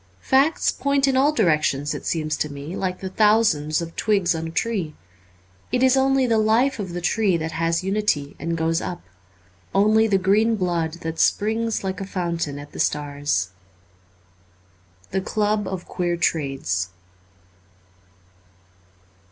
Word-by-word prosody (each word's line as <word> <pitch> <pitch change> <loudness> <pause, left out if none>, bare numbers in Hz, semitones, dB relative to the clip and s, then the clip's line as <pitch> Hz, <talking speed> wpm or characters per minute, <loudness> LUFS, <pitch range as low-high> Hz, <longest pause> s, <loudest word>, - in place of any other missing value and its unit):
Facts 275 +5 +3
point 280 0 +1
in 270 - +2
all 275 +3 +4
directions, 155 - +1
it - - -6
seems 155 -2 -1
to 150 - -2
me, 145 +5 -7
like 185 -1 -3
the 190 - -4
thousands 190 -7 +2
of 165 0 -9
twigs 200 -5 +2
on 165 0 -4
a - - -5
tree. 175 -3 -2 0.8
It 250 0 +1
is 260 0 +5
only 270 0 +3
the 230 -2 +2
life 230 +5 +2
of 190 -4 -4
the 175 - -4
tree 200 -1 +2
that 160 0 -4
has 165 +2 0
unity 190 -8 0
and 165 0 -2
goes 165 +1 0
up 175 - -5 0.4
— - - -33 0.3
only 215 +3 +4
the 200 -3 +3
green 210 +4 +3
blood 170 -5 -1
that 165 -1 -5
springs, 225 +1 +1
like 190 0 -3
a 195 - -5
fountain, 170 -6 -3
at 145 0 -10
the - - -10
stars. 145 -10 -1 0.7
' 90 0 -33
The 190 - 0
Club 210 0 0
of 185 -2 -5
Queer 175 -1 -1
Trades. 135 - -1
180 Hz, 155 wpm, -23 LUFS, 155-215 Hz, 0.8 s, is